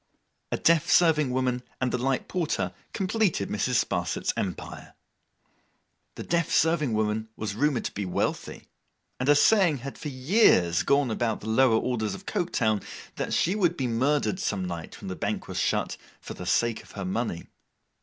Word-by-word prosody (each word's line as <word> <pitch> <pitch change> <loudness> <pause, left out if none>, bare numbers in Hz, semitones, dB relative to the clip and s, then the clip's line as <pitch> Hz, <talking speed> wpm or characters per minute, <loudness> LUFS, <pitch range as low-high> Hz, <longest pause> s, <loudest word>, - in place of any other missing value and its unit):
A - - 0
deaf 165 0 +3
serving 155 -5 +4
woman 125 -1 0 0.2
and 130 -1 0
the - - 0
light 135 0 -1
porter 175 -4 -1 0.2
completed 190 - 0
Mrs. 120 +4 +1
Sparsit's - - -2
empire. 95 -3 -5 1.2
The - - -6
deaf 170 -2 0
serving 155 -6 +2
woman 110 +1 -1
was 105 -2 -4
rumoured 140 +2 0
to - - -2
be 100 - -4
wealthy; 90 - -3 0.5
and 130 +3 0
a 145 - +7
saying 175 -1 +4
had 140 - -7
for 150 - -5
years 130 - +3
gone 140 -3 +2
about 110 -2 -1
among 110 +1 -1
the 130 - +5
lower 110 -2 +3
orders 110 -4 -2
of 195 - -12
Coketown, 110 - 0 0.4
that - - -3
she 180 - +2
would 175 -5 +1
be 130 - -1
murdered 140 +9 +1
some 100 - -1
night 85 -2 -6
when - - -7
the 95 - -4
Bank - - -3
was - - -4
shut, - - 0 0.2
for - - -8
the 90 - -8
sake 110 +5 +1
of - - -17
her 100 -2 -5
money. 95 -2 -2
125 Hz, 175 wpm, -27 LUFS, 110-155 Hz, 1.2 s, a